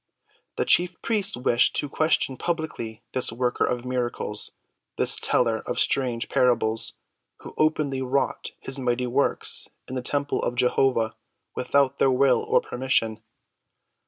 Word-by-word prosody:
The - - 0
chief 180 -1 +3
priests 205 - +1
wished 125 -1 +3
to 145 - -1
question 155 -2 +1
publicly 130 -9 -4
this 130 -3 +1
worker 125 +1 0
of 125 0 -2
miracles—this 120 -4 -3
teller 115 -3 +1
of - - -2
strange 125 -4 0
parables, 115 -3 +1 0.5
who - - -10
openly 150 -3 +1
wrought 130 +1 -1
his 135 +1 -3
mighty 125 -1 0
works 130 +3 -1 0.2
in - - -7
the 130 - -2
temple 145 +3 -1
of 120 - -2
Jehovah 125 -2 +2 0.4
without 140 +1 +1
their - - +4
will 130 -1 +3
or - - +2
permission. 115 -4 -1
125 Hz, 130 wpm, -25 LUFS, 120-140 Hz, 0.5 s, their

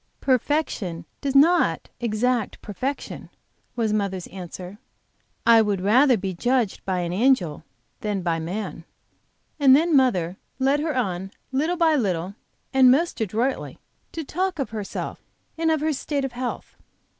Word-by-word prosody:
"Perfection 255 - 0 0.2
does 275 -1 -2
not 330 +6 +4
exact 235 0 0
perfection," 255 +8 -5 0.5
was 225 -3 0
mother's 195 -4 -1
answer. 185 +1 -8 0.7
"I 230 -1 +7
would 205 -3 0
rather 245 +7 +4
be 190 -1 -3
judged 240 +3 0
by 185 -2 0
an 175 0 -3
angel 190 - +2 0.4
than 205 -3 -2
by 170 -2 0
a - - -4
man." 180 +1 -5 0.8
And 270 -2 +7
then 325 +2 +3
mother 190 -10 +2 0.2
led 270 +2 +2
her 305 -2 -1
on, 190 -5 -2 0.2
little 310 +7 0
by 330 -2 +4
little, 190 - -1 0.4
and 265 -1 +7
most 290 +1 +2
adroitly, 225 +6 -1 0.4
to 325 - -4
talk 365 +5 -2
of 275 -6 -3
herself 210 -3 -5 0.3
and 325 0 0
of 315 -2 +1
her 310 0 +1
state 280 0 -2
of 270 - -4
health. 245 +1 -5
240 Hz, 145 wpm, -24 LUFS, 190-275 Hz, 0.8 s, I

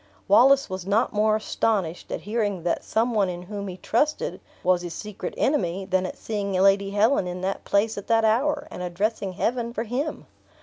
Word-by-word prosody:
Wallace 270 +7 +6
was 185 -1 -6
not 210 +4 +2
more 215 +1 +3
astonished 205 -5 -1
at - - -3
hearing 205 -4 -2
that 175 - -1
some 230 +2 0
one 200 -4 +2
in 175 0 -5
whom 200 +1 -6
he 185 -1 -6
trusted, 300 - 0 0.2
was 180 -1 +3
his 175 -1 -6
secret 205 -4 -6
enemy, 195 - 0
than 185 -1 0
at - - -8
seeing 205 -3 -3
Lady 195 +1 +3
Helen 205 +1 +2
in 180 0 -5
that 195 +1 -3
place 205 +1 +1
at 200 - -12
that 225 -1 +3
hour, 255 +7 +1
and - - -7
addressing 195 +2 -2
Heaven 235 +4 -1
for 225 - -1
him. 260 +7 -3
205 Hz, 190 wpm, -25 LUFS, 185-225 Hz, 0.2 s, Wallace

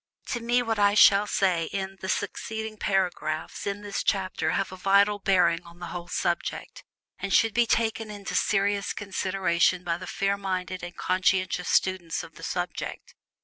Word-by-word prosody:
To 240 - -1
me 240 +1 +1
what 225 -2 -1
I 205 0 +4
shall 205 0 +7
say 180 -5 +1
in 195 +3 -4
the 190 - -4
succeeding 220 +2 -3
paragraphs 175 -4 -1
of 200 +1 -3
this 205 -1 -3
chapter 185 -5 0
have 195 +4 -1
a - - -7
vital 200 +2 +3
bearing 180 -4 +3
on 170 0 -15
the 175 - -7
whole 175 -1 -6
subject, 175 -1 -3 0.4
and 195 +1 -4
should 225 +1 +4
be 235 +1 +3
taken 225 -1 0
into 200 -3 -6
serious 200 +1 +1
consideration 185 -3 0
by 170 -1 -2
the 185 - -8
fair 200 +2 0
minded 185 -2 -3
and 175 0 -8
conscientious 185 -1 +1
student 185 -3 +1
of - - -12
the - - -14
subject. - - -4
195 Hz, 170 wpm, -27 LUFS, 180-205 Hz, 0.4 s, shall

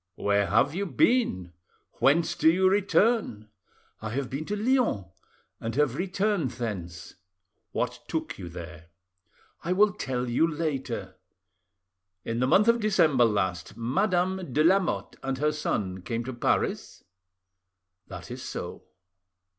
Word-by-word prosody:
"Where 100 0 +1
have 140 - +3
you 195 +3 -2
been? 130 - +1 0.5
Whence 160 +4 +3
do 160 - +4
you 185 +2 +3
return?" 195 - +2 0.5
"I 110 - -4
have 130 +3 -3
been 140 +4 -3
to 205 - -2
Lyons, 225 - +1 0.5
and 115 0 -4
have 145 -4 +2
returned 190 -1 0
thence." 90 -9 -6 0.6
"What - - -2
took - - -4
you 90 -2 -7
there? 85 -1 -9 0.8
"I 175 - 0
will 205 +1 +4
tell 125 -5 -3
you 125 +7 +2
later." 135 - -3 1.1
"In 115 +1 -2
the 125 - +2
month 205 - +4
of 235 0 +5
December 160 - +4
last, 95 -6 -1
Madame 180 - 0
de 150 +5 +2
Lamotte 185 +2 +1
and 135 0 -2
her 150 +3 +1
son 100 -11 -2
came 115 +5 -3
to 130 +2 -5
Paris? 120 - -1 1.0
"That - - -9
is - - -6
so." - - -6
135 Hz, 135 wpm, -27 LUFS, -, 1.1 s, of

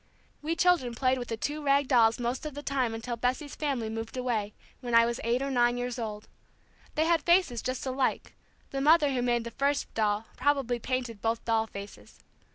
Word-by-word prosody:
We 320 +3 -1
children 335 -9 +2
played 255 +1 +1
with 245 - -5
the 225 - -3
two 295 +6 -3
rag 280 -1 +3
dolls 230 -3 +4
most 245 +2 -2
of 295 - -8
the 290 - -6
time 255 -6 0
until 235 +2 -4
Bessie's 255 +5 -2
family 275 -7 -2
moved 225 +2 -5
away 225 -5 -2 0.2
when 240 -2 -2
I 230 0 +7
was 235 0 -2
eight 240 +3 +1
or 275 - -2
nine 240 -1 +3
years 245 0 -3
old. 210 -2 -5 0.7
They 315 0 +2
had 335 -1 +3
faces 340 - +3
just 255 +3 -3
alike; 260 0 -1 0.4
the 275 - -2
mother 300 -1 +5
who 250 - 0
made 240 -1 +1
the 235 - -6
first 280 +4 -1
doll 215 0 0
probably 260 -3 +1
painted 245 -3 -3
both 225 0 -1
doll 225 -1 +1
faces. 200 -1 -10
250 Hz, 200 wpm, -29 LUFS, 230-280 Hz, 0.7 s, I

